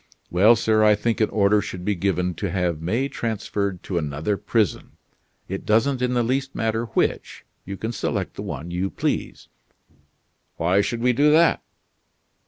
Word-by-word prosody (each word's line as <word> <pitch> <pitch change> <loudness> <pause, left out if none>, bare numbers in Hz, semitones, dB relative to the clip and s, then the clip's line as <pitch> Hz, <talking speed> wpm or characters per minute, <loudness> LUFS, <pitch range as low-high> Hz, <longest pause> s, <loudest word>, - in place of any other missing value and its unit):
"Well, 105 +7 +6
sir, 110 -1 +2
I 105 -1 +6
think 115 +2 -1
an 110 - +3
order 105 0 +3
should 90 -3 -7
be 105 - +1
given 90 -1 -1
to 95 +4 -4
have 90 -3 -1
May 115 +11 0
transferred 100 -6 -3
to 90 -3 -2
another 75 +6 -2
prison. 110 -1 -1 0.5
It 95 +1 -5
doesn't 125 +5 +2
in 125 0 0
the 120 - +2
least 135 +3 -1
matter 110 +1 -1
which; - - -2 0.2
you 100 +1 -6
can 110 +4 -3
select - - -3
the - - -7
one 85 +3 -6
you 90 +2 -1
please." - - -3 1.1
"Why 90 +4 +2
should 115 +3 -3
we 125 +1 +3
do 145 +5 +4
that?" 165 +1 +4
105 Hz, 170 wpm, -23 LUFS, 90-115 Hz, 1.1 s, Well